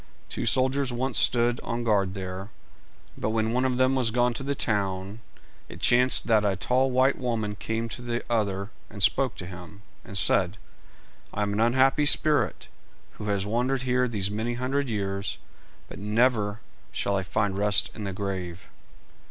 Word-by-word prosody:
Two - - -3
soldiers 130 0 +2
once 130 +3 -1
stood 120 0 +3
on 120 0 -4
guard 100 -4 +1
there 95 0 -5 0.7
together, - - -16
but - - -1
when 110 0 0
one 125 +1 +1
of 125 -1 0
them 130 +1 +3
was 130 -3 +2
gone 120 +1 +1
to 120 - -5
the 140 +1 -2
town, 100 -2 -2 0.5
it - - -10
chanced 125 +1 +4
that 110 -2 +3
a 100 -2 +1
tall 130 +7 +1
white 130 +2 +2
woman 115 -4 -2
came 115 +3 -3
to 120 - -5
the 120 0 -3
other, 100 -3 -1 0.2
and 100 -2 -1
spoke 130 +6 +3
to 90 - -7
him, 90 +3 -11 0.2
and 100 - -3
said 95 0 +3 0.8
"I 105 - 0
am 100 0 -1
an 105 - -1
unhappy 130 +5 +3
spirit, 150 -6 +2 0.5
who 105 - -5
has 100 -1 0
wandered 125 +5 0
here 125 0 +1
these 100 -4 -1
many 110 +3 -2
hundred 130 +2 -1
years, 100 -2 -3 0.5
but - - -10
never 105 0 +1 0.3
shall 100 - -1
I 95 - +1
find 95 +1 -1
rest 100 0 +2
in 105 - -7
the 100 - -3
grave." 95 -2 -5
110 Hz, 175 wpm, -26 LUFS, 100-125 Hz, 0.8 s, chanced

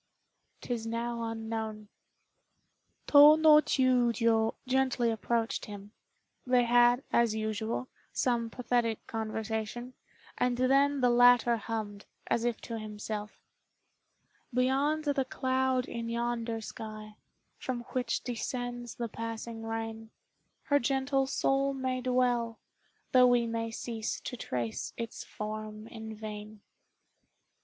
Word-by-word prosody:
'Tis 230 -2 -3
now 235 +1 -2
unknown." 220 -1 -4 1.2
Tô 295 +2 +8
no 305 -1 +8
Chiûjiô 235 -5 +2
gently 255 -2 +2
approached 225 +1 -1
him. 205 -1 -9 0.5
They 250 -1 +3
had, 240 +1 +4
as 235 -2 +3
usual, 220 +3 -2 0.2
some 235 -2 0
pathetic 240 -2 -1
conversation, 220 +2 -4 0.5
and 250 -1 +1
then 275 +2 +3
the 245 -1 +4
latter 245 0 +6
hummed, 215 -2 -5 0.2
as 235 - 0
if 240 -2 0
to 230 -1 -5
himself 210 0 -6 1.1
"Beyond 270 +5 +1
the 285 -2 +1
cloud 260 0 0
in 230 -1 -4
yonder 235 -1 -2
sky, 215 -1 -8 0.4
From 250 -2 -3
which 245 -2 -1
descends 245 0 -4
the 235 - -3
passing 230 0 -6
rain, 225 0 -5 0.5
Her 285 -1 +3
gentle 270 +1 +1
soul 275 0 +1
may 260 -1 -2
dwell, 245 -2 +1 0.5
Though 250 -1 +7
we 245 -1 +3
may 230 0 -2
cease 225 -1 -4
to 250 - -5
trace 120 - -4
its 230 -1 -5
form 215 0 -6
in 220 -1 -8
vain." 210 0 -8
235 Hz, 115 wpm, -30 LUFS, 220-255 Hz, 1.2 s, Tô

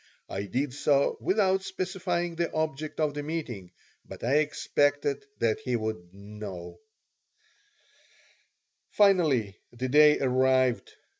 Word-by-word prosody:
I 100 +1 -4
did 130 +5 -2
so 140 0 +2
without 190 -1 +2
specifying 180 -2 -3
the 170 0 -1
object 155 -1 -3
of 155 -2 +1
the 145 - -4
meeting, 145 - -5 0.3
but - - -11
I 130 +5 +3
expected 145 -1 0
that 115 +1 +1
he 125 -4 -2
would 110 -6 -4
know 100 -2 -9 2.1
Finally 155 - +3
the 125 +2 -4
day 150 +2 +6
arrived. 130 -1 +2
140 Hz, 115 wpm, -28 LUFS, 115-160 Hz, 2.1 s, day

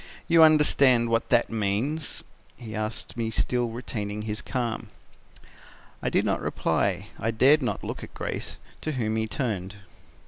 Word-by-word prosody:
You 165 0 +6
understand 140 -6 +5
what 115 0 +1
that 120 - +3
means!' 115 +9 -1 0.3
he 110 -3 -8
asked 110 +1 -4
me 115 -1 -1
still 120 +2 +1
retaining 105 -3 -4
his 105 0 -3
calm. 120 -4 -3 1.1
"I - - 0
did - - +2
not - - 0
reply. 95 +1 0
I 110 - -1
dared 135 +7 +5
not 125 - -2
look - - -5
at - - -11
Grace, - - -4 0.2
to 155 - -2
whom 110 -4 -1
he 110 0 0
turned. 105 -6 -3
115 Hz, 150 wpm, -26 LUFS, 110-130 Hz, 1.1 s, You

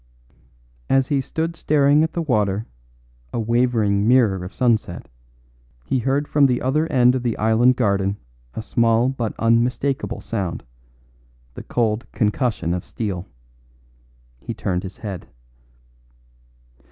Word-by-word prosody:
As 135 +1 +2
he 140 -2 +1
stood 165 +5 -3
staring 145 -1 +3
at 160 - -2
the 170 - -2
water, 105 -6 0 0.7
a - - -2
wavering 110 -3 +1
mirror 115 -7 +3
of 90 - -7
sunset, 110 -8 0 0.8
he 130 - 0
heard 135 +4 0
from 145 -2 +4
the 125 -2 0
other 150 +5 0
end 125 -1 +5
of 130 - -1
the 120 -2 -2
island 115 +4 +3
garden 100 -4 0 0.4
a 110 - -4
small 115 +1 +2
but 120 -5 -3
unmistakable 115 0 0
sound 95 -9 -4 0.9
the - - -8
cold 115 0 -1
concussion 105 - 0
of 90 - -3
steel. 95 -5 -4 1.1
He - - -6
turned 90 -2 -2
his 95 0 -9
head. 100 -5 -7
115 Hz, 130 wpm, -21 LUFS, 105-130 Hz, 1.1 s, end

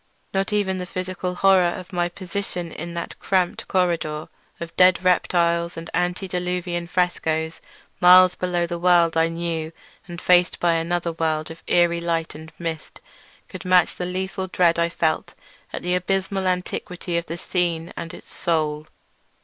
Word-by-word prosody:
Not 195 +1 0
even 195 -3 0
the 180 - -5
physical 185 0 -4
horror 195 0 +5 0.2
of 185 +1 -10
my 175 0 0
position 180 -1 -5
in 170 +2 -7
that 170 - -4
cramped 185 -2 0
corridor 165 -4 0 0.3
of 170 0 -7
dead 185 0 +5
reptiles 170 -2 +2
and 165 0 -7
antediluvian 180 -1 -2
frescoes, 165 -3 -1 0.4
miles 180 0 +8
below 175 -1 -1
the 170 0 -4
world 170 -2 +4
I 165 0 +4
knew 165 -1 -3 0.4
and 175 -1 -7
faced 180 -1 +3
by 175 -1 +3
another 170 +1 -1
world 160 -1 -1
of 165 - -11
eerie 170 -1 +3
light 165 -1 -1
and 155 +1 -11
mist, 165 -2 -6 0.5
could - - -9
match 180 -1 +4
the 180 - -3
lethal 190 +1 -3
dread 175 -2 +2
I 170 0 +2
felt 160 -2 -1 0.4
at - - -5
the 180 +1 0
abysmal 190 +1 0
antiquity 180 -1 -3
of 170 - -9
the 165 - -5
scene 170 -2 -2
and 165 -1 -6
its - - -13
soul. 155 -2 -1
175 Hz, 155 wpm, -23 LUFS, 165-180 Hz, 0.5 s, miles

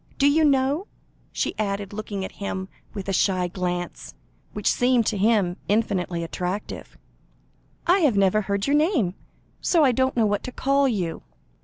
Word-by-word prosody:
Do 280 - +4
you 310 +3 +4
know," 280 +5 +2 0.4
she - - -1
added, 200 -1 -2
looking 205 -2 -4
at - - -7
him 190 -1 -3 0.3
with 200 -2 -5
a 195 - -1
shy 185 -1 +2
glance, 175 0 -4 0.4
which 210 - -7
seemed 245 -2 +2
to - - 0
him 200 -4 +2
infinitely 190 -5 0
attractive, 180 +4 -5 0.9
"I 360 +3 +4
have 285 - +3
never 195 +2 +3
heard 200 0 -1
your 285 - +2
name, 300 - +2 0.5
so 335 -3 +3
I 265 - +5
don't 260 +1 0
know 225 - +4
what 205 -1 0
to 255 - -5
call 275 +2 +2
you." 185 -9 -2
210 Hz, 165 wpm, -24 LUFS, 190-265 Hz, 0.9 s, I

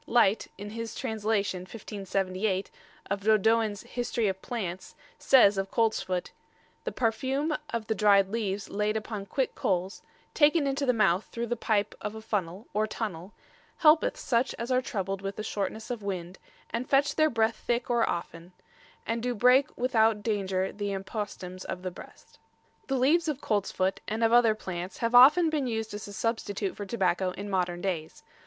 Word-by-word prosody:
Lyte, 225 -3 +3
in 205 +1 -7
his 230 0 -5
translation, 215 -5 -1
1578, 195 0 -3 0.4
of 200 - 0
Dodoens' 215 0 +2
"Historie 240 -2 -1
of 190 0 -4
Plants," 190 -7 -5 0.2
says 205 -7 +5
of 195 0 -2
coltsfoot: 205 -5 0 0.5
"The - - -2
parfume 265 +6 0
of 230 -2 -3
the 220 - 0
dryed 200 -2 +4
leaves 205 -2 -2
layde 210 +1 -1
upon 215 -2 -5
quicke 265 +6 -1
coles, 185 +1 -1 0.3
taken 300 0 +4
into 275 0 -1
the - - +6
mouth 210 -5 +2
through 235 0 -4
the 240 +1 -2
pipe 215 -3 0
of 210 +1 -4
a - - -6
funnell, 205 -2 -3
or 215 +1 +1
tunnell, 200 -4 -5 0.4
helpeth 310 0 +5
suche 245 +1 0
as 235 +2 -4
are 255 0 +3
troubled 195 -5 -3
with 195 0 -4
the 215 - -5
shortnesse 220 +2 -3
of 240 -3 -4
winde, 185 -2 -5 0.3
and 235 +3 -3
fetche 280 +1 +3
their 310 0 +3
breath 225 -3 +1
thicke 240 +1 -1
or 235 -1 +2
often, 170 +1 -5 0.5
and 230 0 -2
do 245 0 -1
breake 250 +6 +5
without 225 -4 +2
daunger 195 -3 -1
the 205 -1 -3
impostems 190 -2 -5
of 180 - -5
the 185 - -3
breast." - - -14 0.5
The 270 - 0
leaves 310 +6 +3
of 295 -3 -1
coltsfoot 195 -4 0
and 220 +2 -1
of 225 0 +3
other 235 -3 +5
plants 185 -3 -6
have 230 0 -1
often 300 +7 +8
been 290 -4 0
used 220 -2 -3
as 205 0 -6
a 205 - -9
substitute 205 -3 -2
for 205 - -6
tobacco 190 -4 +1
in 200 +1 -6
modern 175 -2 -1
days. 175 -5 -4
215 Hz, 175 wpm, -28 LUFS, 195-235 Hz, 0.5 s, often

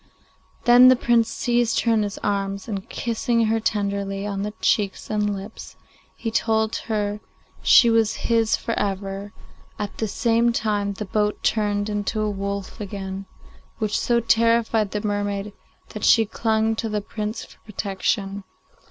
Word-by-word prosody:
Then 245 +1 +8
the 255 - +8
Prince 235 -2 +2
seized 240 -1 +1
her 230 - +2
in 220 - +3
his 205 -1 -3
arms, 200 -1 -2
and 200 -4 -5
kissing 230 0 0
her 225 +1 +1
tenderly 200 -2 -2
on 200 -1 -3
the 210 +1 -4
cheeks 205 -1 0
and 210 -1 +1
lips, 200 +3 -9 0.4
he 225 - -3
told 220 0 +1
her 210 -1 -1 0.4
she 240 - +7
was 225 -1 +2
his 230 -2 +2
for 230 - -3
ever; 195 0 -3 0.5
at 205 -1 -4
the 220 - 0
same 230 +3 +2
moment 205 -2 0
the 210 - -4
boat 210 +1 -1
turned 205 -1 +1
into 210 +1 -2
a 210 -1 0
wolf 200 +1 -4
again, 195 -1 -6 0.5
which 215 -2 -1
so 235 -1 +2
terrified 230 -2 +2
the 210 +1 -4
mermaid 205 0 -2 0.4
that - - -8
she 225 -2 +5
clung 220 +1 0
to 225 - -2
the 210 -1 -1
Prince 215 +2 -5
for - - -19
protection. 200 -1 -2
210 Hz, 155 wpm, -23 LUFS, 200-225 Hz, 0.5 s, Then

